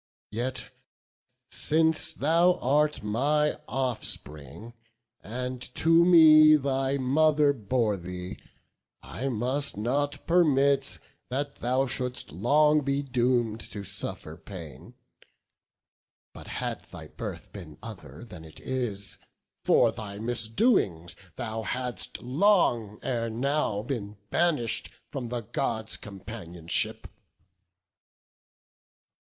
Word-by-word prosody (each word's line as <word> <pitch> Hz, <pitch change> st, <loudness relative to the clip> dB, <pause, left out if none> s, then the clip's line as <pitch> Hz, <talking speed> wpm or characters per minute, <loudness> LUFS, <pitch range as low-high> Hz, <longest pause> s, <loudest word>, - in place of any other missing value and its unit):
Yet 125 Hz, +4 st, -4 dB, 0.8 s
since 160 Hz, +1 st, +1 dB
thou 170 Hz, +5 st, +4 dB
art 150 Hz, +1 st, +1 dB
my 145 Hz, +8 st, +1 dB
offspring, 115 Hz, -, -3 dB, 0.5 s
and 125 Hz, +3 st, -5 dB
to 165 Hz, +1 st, +5 dB
me 155 Hz, -3 st, +8 dB
Thy 135 Hz, -1 st, 0 dB
mother 145 Hz, +2 st, +3 dB
bore 110 Hz, -3 st, 0 dB
thee, 90 Hz, 0 st, -7 dB, 0.6 s
I 100 Hz, -, -4 dB
must 130 Hz, +2 st, -1 dB
not 140 Hz, +7 st, -1 dB
permit 140 Hz, -5 st, +3 dB, 0.3 s
That 140 Hz, +3 st, -3 dB
thou 130 Hz, +3 st, +1 dB
should'st 125 Hz, -, -2 dB
long 150 Hz, -, +3 dB
be 140 Hz, 0 st, -1 dB
doom'd 120 Hz, -4 st, +1 dB
to 100 Hz, -1 st, -6 dB
suffer 95 Hz, -5 st, -6 dB
pain; 85 Hz, -10 st, -10 dB, 1.4 s
But -, -, -12 dB
had -, -, -4 dB
thy -, -, -10 dB
birth -, -, -7 dB
been 85 Hz, -7 st, -10 dB
other 85 Hz, -, -10 dB
than 90 Hz, -8 st, -11 dB
it 80 Hz, -1 st, -12 dB
is, 105 Hz, -8 st, -4 dB, 0.4 s
For -, -, +4 dB
thy 100 Hz, -2 st, -8 dB
misdoings 110 Hz, -, +1 dB, 0.2 s
thou 115 Hz, -3 st, -4 dB
hadst 125 Hz, +3 st, -4 dB
long 125 Hz, -, +2 dB
ere 115 Hz, -2 st, -1 dB
now 120 Hz, -3 st, -1 dB
Been 105 Hz, -5 st, -5 dB
banish'd 150 Hz, -10 st, +1 dB, 0.2 s
from 130 Hz, -5 st, -4 dB
the 120 Hz, 0 st, -3 dB
Gods' 110 Hz, 0 st, -3 dB
companionship." 95 Hz, -5 st, -3 dB
125 Hz, 100 wpm, -27 LUFS, 105-145 Hz, 1.4 s, me